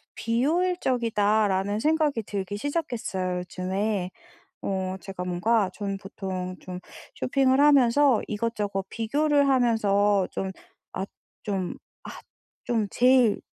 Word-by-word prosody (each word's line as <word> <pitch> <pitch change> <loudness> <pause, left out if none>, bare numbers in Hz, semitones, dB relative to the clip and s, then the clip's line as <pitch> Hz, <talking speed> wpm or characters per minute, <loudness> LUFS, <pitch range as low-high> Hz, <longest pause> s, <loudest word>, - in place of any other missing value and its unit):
비효율적이다.'라는 230 - +1
생각이 300 -4 +1
들기 200 -1 -4
시작했어요 225 - -2
요즘에. 185 +2 -2 0.5
어 190 -1 -2
제가 190 0 -6
뭔가 185 +3 +1
전 200 -1 -4
보통 185 -2 -5
좀 180 0 -7 0.3
쇼핑을 265 0 +2
하면서 275 -3 +5
이것저것 210 -3 -2
비교를 285 +5 +1
하면서 205 -6 +3
좀 190 - -3 0.4
아 190 - -3 0.4
좀 190 -3 -2 0.3
아 - - -7 0.5
좀 225 -3 0
'제일 250 -3 +4
210 Hz, 235 characters per minute, -26 LUFS, 190-255 Hz, 0.5 s, 하면서